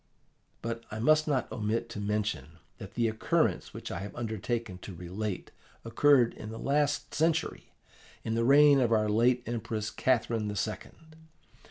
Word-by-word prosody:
but 115 0 -4
I 110 - -6
must 155 +7 +3
not 140 -4 0
omit 110 +1 -1
to 115 - -6
mention 105 -7 -2 0.2
that 100 -1 -10
the 120 -1 +2
occurrence 110 0 0
which - - -7
I - - -4
have 100 +1 -7
undertaken 115 -3 -3
to 95 0 -9
relate 90 +3 -5 0.3
occurred 125 +1 +4
the 110 +1 -7
last 145 +2 0
century, 160 0 0 0.5
in 110 - -2
the 115 +1 +1
reign 140 +2 +6
of 120 -3 +2
our 110 -1 +3
late 120 +3 +3
Empress 110 -2 -3
Catherine 115 -3 0
the 105 - -3
Second. 155 +10 -6
115 Hz, 155 wpm, -29 LUFS, 105-130 Hz, 0.5 s, reign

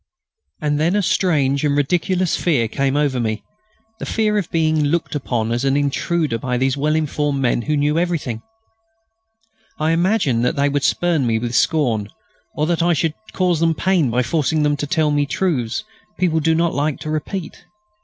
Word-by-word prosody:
And 150 -1 0
then 170 +5 +2
a 205 - +1
strange 145 -7 +1
and 145 -1 +1
ridiculous 180 +4 +1
fear 140 -10 +1
came 135 +4 0
over 140 -4 +1
me; 110 -2 -2 0.6
the - - -5
fear 215 -1 +1
of 185 - -5
being 155 -2 +1
looked 165 +3 -1
upon 120 -6 -2
as 120 +2 -1
an 135 0 +2
intruder 145 -1 0
by 125 +1 -2
these 130 +1 +1
well 150 +2 0
informed 150 -2 -1
men 120 -2 +1
who 150 +4 -1
knew 150 +3 +1
everything. 160 -10 -2 1.4
I 155 +1 +1
imagined 165 - +1
that 125 - +1
they 140 0 +2
would 140 -1 -1
spurn 160 -2 +1
me 115 -1 +1
with 120 +1 -3
scorn, 120 -9 +1 0.5
or 150 - 0
that 170 +1 0
I 175 +1 +3
should 160 0 0 0.2
cause 180 -3 +1
them 165 0 +2
pain 180 -6 +1
by 125 +2 +1
forcing 155 +2 0
them 145 0 +2
to 145 - -3
tell 155 -1 +1
me 145 -1 +1
truths 140 - -1 0.3
people 170 -3 +1
do 160 +1 +2
not 165 0 +1
like 145 0 -1
to 155 - -4
repeat. 155 +3 -5
150 Hz, 185 wpm, -20 LUFS, 135-165 Hz, 1.4 s, I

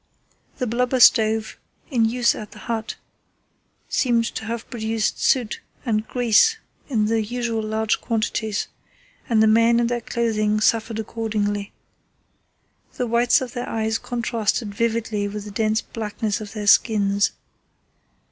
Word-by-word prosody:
The 255 - -1
blubber 250 +2 0
stove 220 -2 +4 0.3
in 235 -4 +3
use 235 +1 +2
at 210 - -9
the - - -13
hut 225 -2 -4 0.9
seemed 235 -3 +1
to 220 - -5
have 230 +1 -5
produced 220 -2 -2
soot 245 -5 +1 0.2
and 220 -2 0
grease 245 - +3 0.3
in 220 -6 +1
the 225 +1 +1
usual 235 0 -2
large 220 0 -1
quantities, 220 -2 -1 0.6
and 220 -2 +4
the - - +5
men 230 +2 +4
and 235 -1 +1
their 240 -1 -1
clothing 215 -2 0
suffered 225 0 +1
accordingly. 210 -2 -2 1.2
The 250 - -2
whites 240 +2 +3
of 255 -2 -5
their 245 0 -4
eyes 220 0 -1
contrasted 230 -3 -2
vividly 225 -2 -1
with 205 0 -6
the 210 - -8
dense 215 +1 +1
blackness 215 -1 -3
of 210 -1 -8
their 210 -2 -5
skins. 205 -2 +3
225 Hz, 140 wpm, -22 LUFS, 215-235 Hz, 1.2 s, the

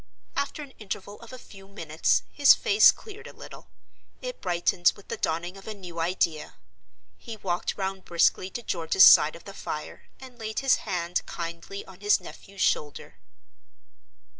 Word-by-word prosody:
After 280 +2 -3
an 280 - -12
interval 205 -1 -7
of 230 - -13
a 255 - -9
few 195 -5 -15
minutes, 165 -6 0
his 285 -1 +6
face 435 -3 +6
cleared 430 0 -12
a - - -11
little; - - -12 0.5
it - - -7
brightened 175 -1 +2
with 200 - -17
the - - -4
dawning 175 +4 -3
of 195 - -14
a 215 - -5
new 175 -4 -9
idea. 165 -2 -1 0.6
He 225 -2 -8
walked 180 -3 -3
round 190 -1 -4
briskly 175 +2 +1
to 240 +5 -7
George's 170 +1 +3
side 150 +1 +8
of 170 - -13
the 200 - -10
fire, 155 -5 -7
and 255 -2 -13
laid 220 +1 -4
his 270 -1 +4
hand 175 -2 -1
kindly 170 +4 -7
on 190 -1 -15
his 205 +1 +3
nephew's 195 -1 -11
shoulder. 145 -9 -1
195 Hz, 165 wpm, -26 LUFS, 170-220 Hz, 0.6 s, side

